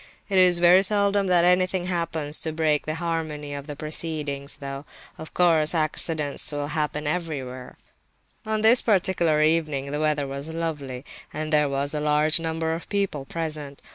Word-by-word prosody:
It 195 -2 +3
is 180 -1 +6
very 175 +2 +6
seldom 200 0 +1
that 175 -2 +3
anything 180 0 +2
happens 165 -4 -2
to 160 - -2
break 155 -2 0
the 155 - -2
harmony 160 -3 -4
of 140 +1 -7
the 145 - -6
proceedings, 150 -2 -4
though, 140 -1 -7 0.4
of 160 - -10
course, 165 -2 +4
accidents 155 -2 0
will 145 0 -3
happen 150 -1 -2
everywhere. 140 -6 -4 0.7
On 215 0 -2
this 225 +3 +6
particular 175 -7 +2
evening 155 -4 +1
the 150 - -2
weather 150 -2 +1
was 140 +3 -6
lovely, 150 -6 -5 0.3
and 155 +1 -4
there 150 -1 +3
were 140 +1 -1
a 150 - -2
large 150 +2 +2
number 160 0 -2
of 165 - -7
people 195 -9 -2
present. 150 -2 -5
155 Hz, 165 wpm, -24 LUFS, 145-170 Hz, 0.7 s, is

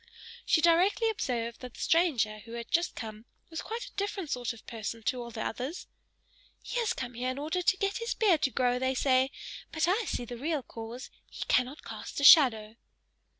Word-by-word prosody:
She 320 - +4
directly 365 +7 +4
observed 235 - -3
that 250 -1 -9
the - - -13
stranger 250 -11 +2
who 230 +2 -12
had 235 0 -7
just 340 +2 +1
come 215 0 -7 0.3
was 325 - -4
quite 460 +2 -5
a - - -12
different 400 -5 -3
sort 245 -1 -1
of 230 -2 -12
person 225 0 -6
to 250 +2 -1
all 235 - -7
the 225 -1 -5
others; 260 +9 -4 0.8
"He - - -2
has 460 -3 +1
come 250 -1 -5
here 250 +2 -2
in 255 - -4
order 315 +5 -1
to 380 +2 +2
get 395 0 -1
his 465 +1 -3
beard 380 -9 +3
to 270 - +2
grow, 250 -1 +1
they 260 +1 0
say, 260 0 +3 0.4
but 315 0 +1
I 410 +5 +2
see 245 - -3
the 240 +1 -7
real 295 +2 -2
cause, 230 +3 -8 0.2
he - - -6
cannot 250 +4 +1
cast - - -6
a - - -2
shadow." 230 -8 +7
260 Hz, 205 wpm, -30 LUFS, 235-345 Hz, 0.8 s, shadow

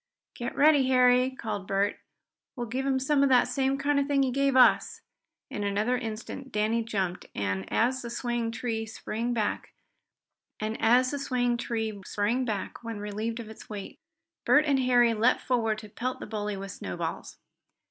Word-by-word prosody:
"Get 240 +1 -5
ready, 290 -2 +5
Harry!" 250 0 +4
called 215 -7 -5
Bert. 200 +1 0 0.6
"We'll 240 -3 -3
give 260 +4 -3
him 270 -1 +2
some 275 +2 +2
of 280 - +4
the 250 -2 +5
same 265 +2 0
kind 285 +1 +1
of 280 - +1
a - - -9
thing 280 -1 +2
he 260 - 0
gave 275 +1 +1
us!" 255 - +4 0.5
In 205 - -3
another 205 +5 +1
instant 245 +3 -6
Danny 220 +2 +1
jumped, 190 -5 -3
and 95 -1 -2
as 255 +3 +1
the 235 - -6
swaying 240 -1 -2
tree 225 -1 -3
sprang 225 +2 -4
back, 215 -2 -1 0.9
when 215 +1 -3 2.2
relieved 215 +3 -4
of 235 - -6
his 220 - -12
weight, 205 -2 -7 0.4
Bert 300 +1 +5
and 280 -3 +2
Harry 245 -2 +4
leaped 225 +3 +2
forward 225 -4 0
to 215 -1 -10
pelt 255 +5 -4
the - - -6
bully 210 -1 -3
with 195 0 -6
snowballs. 90 - -5
235 Hz, 160 wpm, -28 LUFS, 215-260 Hz, 2.2 s, ready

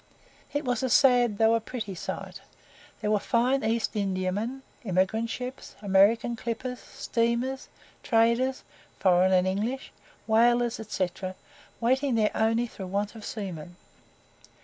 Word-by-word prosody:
It 290 0 -2
was 245 -2 0
a 260 - 0
sad 245 -5 +4
though 225 +1 +4
a 230 - +3
pretty 220 -4 -5
sight. 175 - -6 0.6
There 210 - 0
were 210 - +3
fine 250 +5 +1
East 225 0 0
Indiamen, 200 +6 -2 0.2
emigrant 195 +3 0
ships, 250 +3 -6
American 210 +4 +3
clippers, 240 +2 -4
steamers, 235 +3 -2 0.3
traders 235 +3 +2 0.3
foreign 185 0 +4
and 185 -1 +4
English 220 +8 -2 0.3
whalers, 240 +1 +3
&c., 185 -3 +1 0.7
waiting 260 +2 +1
there 215 -2 +2
only 225 +2 +2
through 195 -5 -8
want 200 +2 -2
of 220 -2 -11
seamen. 175 -6 -6
225 Hz, 125 wpm, -27 LUFS, 200-245 Hz, 0.7 s, sad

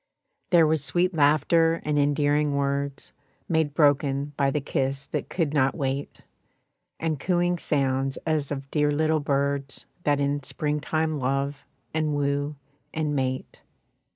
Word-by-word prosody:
There 170 -3 +6
was 155 -2 +1
sweet 175 +7 +1
laughter 165 +2 +3
and 150 -1 +1
endearing 145 0 +2
words, 140 0 -2 0.3
Made 160 -3 0
broken 145 -1 +2
by 140 -1 +2
the 150 - 0
kiss 135 0 -2
that - - -4
could 160 -5 -1
not 135 -2 +2
wait, 140 -1 -3 0.8
And 160 -3 -1
cooing 175 +1 +1
sounds 135 -2 0
as 155 -3 0
of 135 -1 -5
dear 150 -1 +2
little 155 +1 +2
birds 140 -1 -1 0.2
That 145 -3 +1
in 145 0 0
spring 150 +2 -2
time 155 0 -1
love 140 +2 -2 0.3
and 155 -1 0
woo 145 +1 -1 0.4
and 155 -2 -1
mate. 130 -1 -3
145 Hz, 140 wpm, -26 LUFS, 140-155 Hz, 0.8 s, There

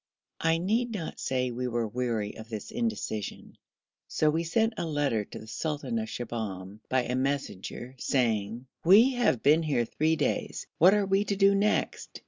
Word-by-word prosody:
I 165 0 +2
need 220 +8 0
not 175 -6 -5
say 125 -1 -1
we 125 +1 -3
were 120 -2 -1
weary 115 -2 -2
of 110 +1 -10
this 110 -3 -6
indecision, 220 - -4 0.5
so 155 -1 +2
we 165 +2 0
sent 220 +7 +1
a - - -1
letter 145 -8 0
to - - -10
the - - -9
sultan 155 - -3
of 220 0 -4
Shibahm 105 -5 -5
by 130 -1 +2
a 125 - -3
messenger 130 -3 -3
saying, 115 -2 0 0.2
'We 210 +9 +7
have 240 - +1
been 150 +4 +5
here 145 -7 +1
three 155 +7 +1
days; 150 - -2
what 185 +5 +7
are 205 -1 +2
we 195 +1 +2
to 200 - -1
do 195 0 +5
next?' 205 +2 0
145 Hz, 175 wpm, -28 LUFS, 115-195 Hz, 0.5 s, We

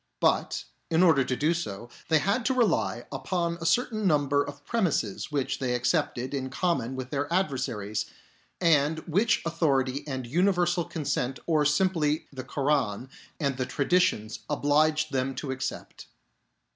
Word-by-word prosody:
But, - - +1 0.3
in 165 +2 +4
order 160 -6 +5
to 130 - -1
do 155 +6 +2
so, 120 -10 -5 0.2
they 160 - +5
had 200 - +1
to 260 - +2
rely 240 -3 +1
upon 170 -2 -2
a 165 - -1
certain 220 -2 +1
number 145 -3 +3
of 145 0 -10
premises, 165 - -1
which 140 -3 -1
'they 125 -2 0
accepted 130 0 0
in 130 -2 -2
common 135 -5 -1
with 130 -1 -6
their 145 +1 -2
adversaries, 125 - -1 0.5
and 160 -3 +3
which 205 +7 +2
authority 140 -5 +1
and 130 -3 -4
universal 175 +4 +2
consent 135 -4 -2
i - - -20
or 155 -3 +2
simply 155 -1 +1
the 130 -1 -6
Koran 135 -4 0 0.3
and 140 -4 -1
the 130 -1 -2
traditions 140 - +1
obliged 150 +1 +2
them 135 0 -1
to 140 - -4
accept. 130 0 -5
145 Hz, 150 wpm, -27 LUFS, 130-170 Hz, 0.5 s, order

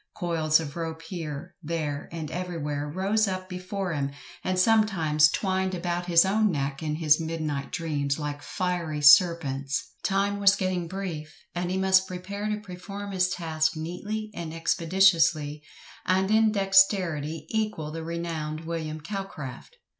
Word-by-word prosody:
Coils 165 -4 +2
of 150 -3 -6
rope 165 -1 -4
here, 165 -1 -6
there, 150 -3 -3
and 160 -2 -5
everywhere 150 -5 -3
rose 200 +6 +1
up 185 -1 -3
before 185 0 -4
him, 140 -2 -1 0.3
and 185 0 -1
sometimes 185 -8 +4
twined 190 +1 0
about 175 0 -2
his 170 0 +6
own 210 +2 +3
neck 140 -3 -2
in 155 -1 -2
his 155 -1 +4
midnight 155 -3 -3
dreams, 145 -4 -1
like 145 -1 -4
fiery 175 -4 -2
serpents. 145 -4 +4
Time 200 +1 0
was 200 0 +6
getting 185 -3 -1
brief, 170 -4 -5 0.2
and 175 0 -2
he 185 - -1
must 190 0 +4
prepare 200 +3 -5
to 210 - 0
perform 200 +1 -7
his 185 -1 +2
task 160 -3 0
neatly 210 +7 -4
and 165 -3 -6
expeditiously, 165 -3 +3 0.4
and 190 +2 +1
in 220 0 +5
dexterity 190 -6 +2
equal 215 -9 -2
the 165 +1 -5
renowned 160 -2 -4
William 160 -2 -4
Calcraft. 195 - -7
170 Hz, 145 wpm, -27 LUFS, 155-190 Hz, 0.4 s, his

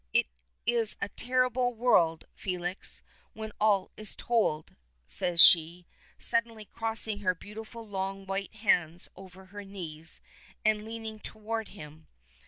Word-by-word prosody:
It - - +4 0.4
is 230 -1 +3
a 200 - -3
terrible 250 0 0
world, 170 -9 +3
Felix, 180 0 -5 0.3
when 220 0 -7
all 205 -3 +3
is 215 -1 +6
told," 215 -10 0 0.3
says 175 - 0
she, 170 +1 +7 0.3
suddenly 230 -2 0
crossing 225 -1 -3
her 185 -3 +1
beautiful 220 +4 -10
long 195 0 -4
white 195 +2 -4
hands 175 -6 +1
over 190 0 -13
her 205 0 -7
knees, 165 -5 -5 0.5
and 215 -1 +2
leaning 220 -1 -7
toward 220 +1 -5
him. 155 -4 -12
205 Hz, 125 wpm, -29 LUFS, 180-225 Hz, 0.5 s, she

